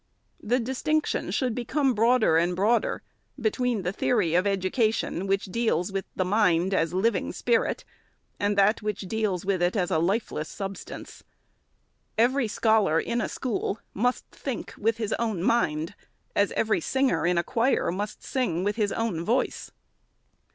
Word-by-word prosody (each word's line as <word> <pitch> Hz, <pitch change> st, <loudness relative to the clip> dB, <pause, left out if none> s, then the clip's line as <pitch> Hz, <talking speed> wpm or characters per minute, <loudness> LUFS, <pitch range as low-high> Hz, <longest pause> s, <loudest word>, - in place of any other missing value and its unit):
The 245 Hz, +4 st, +1 dB
distinction 265 Hz, +6 st, -1 dB
should 255 Hz, -4 st, 0 dB
bcome 260 Hz, +3 st, 0 dB
broader 230 Hz, -4 st, +3 dB
and 175 Hz, +2 st, +2 dB
broader, 215 Hz, +6 st, +1 dB, 0.4 s
between 235 Hz, -2 st, 0 dB
the 180 Hz, -, -1 dB
theory 200 Hz, -6 st, +1 dB
of 180 Hz, +3 st, +3 dB
education 195 Hz, -1 st, 0 dB
which 195 Hz, 0 st, +1 dB
deals 200 Hz, -3 st, 0 dB
with 195 Hz, 0 st, -3 dB
mind 185 Hz, -2 st, +2 dB
as 165 Hz, -4 st, +1 dB
living 195 Hz, +2 st, 0 dB
spirit, 235 Hz, -2 st, 0 dB, 0.5 s
and 205 Hz, 0 st, 0 dB
that 200 Hz, +3 st, +4 dB
which 210 Hz, -1 st, -3 dB
deals 200 Hz, -2 st, -2 dB
with 190 Hz, -2 st, 0 dB
it 175 Hz, +3 st, +2 dB
as 180 Hz, -4 st, 0 dB
a 160 Hz, -, +2 dB
lifeless 175 Hz, -3 st, -1 dB
substance. 195 Hz, -2 st, -7 dB, 0.9 s
Every 245 Hz, +2 st, +3 dB
scholar, 220 Hz, -6 st, +3 dB
in 235 Hz, +6 st, -1 dB
a -, -, -2 dB
school, 225 Hz, -4 st, -2 dB, 0.2 s
must 245 Hz, +5 st, 0 dB
think 265 Hz, -5 st, -5 dB
with 225 Hz, +1 st, 0 dB
his 220 Hz, -2 st, -2 dB
own 220 Hz, -7 st, -1 dB
mind, 165 Hz, -7 st, +1 dB, 0.4 s
as 200 Hz, 0 st, +2 dB
every 215 Hz, -6 st, +1 dB
singer, 250 Hz, -, +1 dB
in 180 Hz, 0 st, +2 dB
a 170 Hz, -, +2 dB
choir, 240 Hz, 0 st, +1 dB
must 205 Hz, +4 st, -5 dB
sing 210 Hz, -, -1 dB
with 205 Hz, +2 st, -1 dB
his 210 Hz, -3 st, +1 dB
own 215 Hz, -8 st, -1 dB
voice. 235 Hz, +8 st, -1 dB
210 Hz, 150 wpm, -26 LUFS, 185-235 Hz, 0.9 s, that